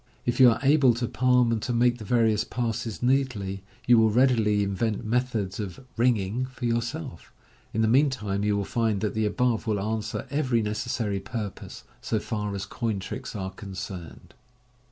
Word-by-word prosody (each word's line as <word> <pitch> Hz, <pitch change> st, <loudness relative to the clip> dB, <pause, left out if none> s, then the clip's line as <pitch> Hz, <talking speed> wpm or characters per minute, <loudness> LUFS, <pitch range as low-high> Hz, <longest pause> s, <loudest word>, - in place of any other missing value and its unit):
If 120 Hz, -, -1 dB
you 130 Hz, -2 st, +9 dB
are 115 Hz, -, +2 dB
able 135 Hz, -4 st, +5 dB
to 120 Hz, 0 st, -2 dB
palm 125 Hz, -1 st, +3 dB
and 110 Hz, -2 st, 0 dB
to 125 Hz, -, -2 dB
make 120 Hz, +1 st, +2 dB
the -, -, -7 dB
various 110 Hz, -2 st, +2 dB
passes 115 Hz, -2 st, -3 dB
neatly, 125 Hz, -7 st, 0 dB, 0.2 s
you 120 Hz, -1 st, +6 dB
will 110 Hz, 0 st, +5 dB
readily 110 Hz, -3 st, +3 dB
invent 100 Hz, +3 st, -1 dB
method* 115 Hz, -4 st, 0 dB
<>f 95 Hz, -4 st, -6 dB
" -, -, -34 dB
ringing" 120 Hz, 0 st, +1 dB
for 130 Hz, -1 st, -7 dB
yourself; 120 Hz, -, -3 dB, 0.4 s
in 110 Hz, -, 0 dB
the -, -, +3 dB
meantime, 115 Hz, -6 st, +2 dB
you 105 Hz, -1 st, +1 dB
will 100 Hz, -, -2 dB
rind 110 Hz, -4 st, +1 dB
that 105 Hz, -, -1 dB
the 110 Hz, -1 st, +1 dB
above 120 Hz, +1 st, 0 dB
will 105 Hz, -2 st, +1 dB
answer 110 Hz, +2 st, -3 dB
every 130 Hz, -6 st, +1 dB
necessary 105 Hz, -1 st, -2 dB
purpose, 105 Hz, -1 st, -6 dB, 0.2 s
so 110 Hz, -, -1 dB
fax 105 Hz, -2 st, -3 dB
as 95 Hz, -1 st, -4 dB
coin 110 Hz, +1 st, -2 dB
tricks 95 Hz, -, -6 dB
are 95 Hz, -2 st, -4 dB
cuaceraed. 95 Hz, -3 st, -8 dB
110 Hz, 175 wpm, -26 LUFS, 105-125 Hz, 0.4 s, you